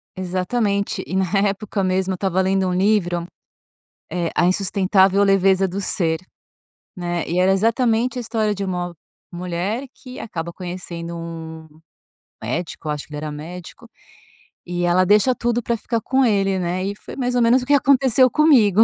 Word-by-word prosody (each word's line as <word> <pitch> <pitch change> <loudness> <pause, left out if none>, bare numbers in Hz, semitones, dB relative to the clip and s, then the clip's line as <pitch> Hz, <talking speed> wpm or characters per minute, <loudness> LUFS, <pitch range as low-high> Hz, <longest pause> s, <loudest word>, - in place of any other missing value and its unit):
Exatamente 200 +3 -1
e - - -4
na 190 0 +2 0.2
época 200 0 -3
mesmo 185 0 0
eu - - -2
estava 190 0 -1
lendo 190 0 +1
um 180 - -1
livro, 180 -3 +1 0.9
eh, 170 0 -1
A - - +2
Insustentável 195 +1 +3
Leveza 195 -1 +3
Do 190 +3 -4
Ser, 165 -4 +1 0.8
né. 175 -1 -2
E 175 +2 0
era 185 +1 +4
exatamente 230 +4 +1
a - - -2
história 220 -3 -1
de 200 - -4
uma 180 -2 -3 0.4
mulher 180 +7 -3
que 255 -1 -11
acaba 170 -5 -5
conhecendo 175 -2 -6
um 160 -1 -8 0.8
médico 165 -2 -4
acho 150 -1 -3
que - - -18
ele - - -4
era 150 0 -4
médico 175 +9 -9 0.8
e 175 0 -2
ela 175 +1 +3
deixa 210 +6 +4
tudo 240 0 -1
pra 235 +1 -1
ficar 230 +1 -2
com 265 +4 +1
ele, 195 -4 +2
né. 180 +1 -2
E 200 +1 -3
foi - - -11
mais 250 -2 -1
ou 245 - +3
menos 240 +2 +4
o - - -7
que 285 - +3
aconteceu 265 -2 +4
comigo. 230 - +4
190 Hz, 170 wpm, -21 LUFS, 175-220 Hz, 0.9 s, era